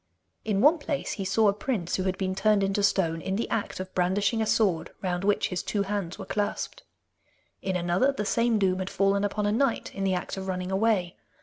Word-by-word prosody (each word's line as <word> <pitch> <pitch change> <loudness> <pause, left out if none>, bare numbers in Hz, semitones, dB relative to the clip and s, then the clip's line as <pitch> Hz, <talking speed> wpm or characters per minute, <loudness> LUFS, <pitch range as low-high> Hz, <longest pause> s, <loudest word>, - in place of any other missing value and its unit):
In 205 -2 0
one 310 +6 +5
place 290 -1 -3
he 195 - -4
saw 215 +3 +3
a 200 - +4
prince 205 -5 -2
who 185 - -1
had 190 0 -1
been 185 -1 -1
turned 200 +1 +2
into 195 +1 0
stone 170 -5 +1
in 190 +3 -2
the 225 - -1
act 220 -4 -2
of 185 0 -6
brandishing 200 +5 +1
a 220 - 0
sword 190 -9 +2
round 180 -1 -1
which 205 0 +2
his 180 - -2
two 205 -2 -1
hands 200 -4 -3
were - - -7
clasped. 205 -1 -3 0.8
In 190 -1 -2
another, 180 +9 +2
the 240 -7 -3
same 230 +1 +2
doom 190 -2 +1
had 185 0 -3
fallen 200 0 +1
upon 205 +1 -1
a 205 - +2
knight 235 +2 0
in 195 - -4
the 190 -1 +2
act 180 - -4
of 190 0 -5
running 180 0 -3
away. 190 -3 +1
195 Hz, 225 wpm, -27 LUFS, 185-215 Hz, 0.8 s, one